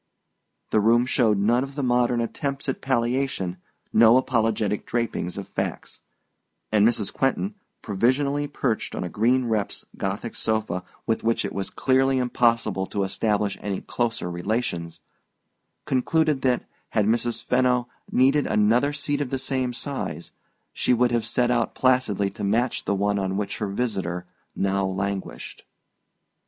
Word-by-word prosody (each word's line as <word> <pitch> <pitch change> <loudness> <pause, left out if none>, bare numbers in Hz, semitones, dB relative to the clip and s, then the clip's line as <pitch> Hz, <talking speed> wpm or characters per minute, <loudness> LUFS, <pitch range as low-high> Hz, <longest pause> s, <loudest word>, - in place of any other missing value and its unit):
The 110 - +4
room 115 +3 +4
showed 120 -5 +2
none 115 +6 +3
of 135 0 -8
the 145 - -2
modern 120 -1 +2
attempts 140 +4 -3
at 135 - -2
palliation, 120 -7 0 0.4
no 115 +2 +7
apologetic 110 -5 +1
draping 115 -7 -1
of 100 - -5
facts; - - -4 0.7
and 105 0 +5
Mrs. 110 -4 0
Quentin, 165 +10 0 0.3
provisionally 135 +7 +1
perched 130 -5 -2
on - - -3
a 90 - -4
green 120 +7 +2
reps 110 -3 -2
Gothic 100 +4 -3
sofa 110 -5 -1 0.2
with 115 - 0
which 115 0 +1
it - - -4
was 100 -1 -3
clearly 135 0 +2
impossible 115 -6 +1
to 100 - -1
establish 105 0 0
any 100 -2 -2
closer 120 -5 -2
relations, 85 -2 -3 0.8
concluded 150 +2 +1
that, 125 -2 +1 0.2
had 105 -2 +1
Mrs. 115 +2 +1
Fenno 125 -1 +2 0.2
needed 135 +3 +3
another 120 +7 +3
seat 145 -1 -2
of 140 - -2
the 135 - -1
same 130 -1 -1
size, 125 - -5 0.4
she 125 - +2
would 120 +1 +2
have 115 -2 0
set 120 +1 +1
out 120 -2 0
placidly 120 -7 +2
to - - -7
match 115 +5 0
the 100 - +1
one 100 +1 +1
on 95 0 -1
which 105 -1 -3
her 105 - -1
visitor 95 -5 -2 0.3
now 100 0 +1
languished. 95 +1 -4
115 Hz, 145 wpm, -25 LUFS, 100-130 Hz, 0.8 s, no